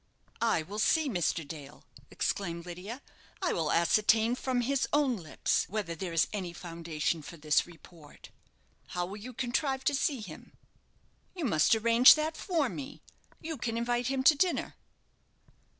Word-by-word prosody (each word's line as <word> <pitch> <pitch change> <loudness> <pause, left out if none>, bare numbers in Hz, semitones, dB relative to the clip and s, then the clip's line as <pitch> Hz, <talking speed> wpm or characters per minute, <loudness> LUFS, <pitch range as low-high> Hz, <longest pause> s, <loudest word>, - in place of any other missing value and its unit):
"I 225 -8 +2
will 200 +6 -7
see 315 +7 +3
Mr. 175 - -1
Dale," 145 -2 -10 0.3
exclaimed 170 -3 -3
Lydia. 190 +9 -8 0.4
"I 370 - 0
will 160 -3 -1
ascertain 220 +6 +3
from 255 0 -1
his 270 +2 0
own 290 -4 +2
lips 165 -7 -1
whether 200 -4 -3
there 175 +1 -5
is 165 0 +3
any 185 -5 -4
foundation 165 -2 -3
for 170 +3 -10
this 150 +1 +2
report." 165 -3 -15 0.7
"How 175 - +1
will 195 +3 -7
you 235 +5 -8
contrive 265 +2 -1
to 290 - +2
see 275 -1 0
him?" 170 -7 -11 0.8
"You 345 -5 -3
must 160 - +4
arrange 230 +3 +7
that 310 +1 -2
for 330 -7 0
me. 275 +2 -8 0.4
You 320 -1 -5
can 230 -1 -3
invite 240 +1 0
him 265 0 -1
to 270 - +8
dinner." 350 +4 0
220 Hz, 155 wpm, -30 LUFS, 170-265 Hz, 0.8 s, to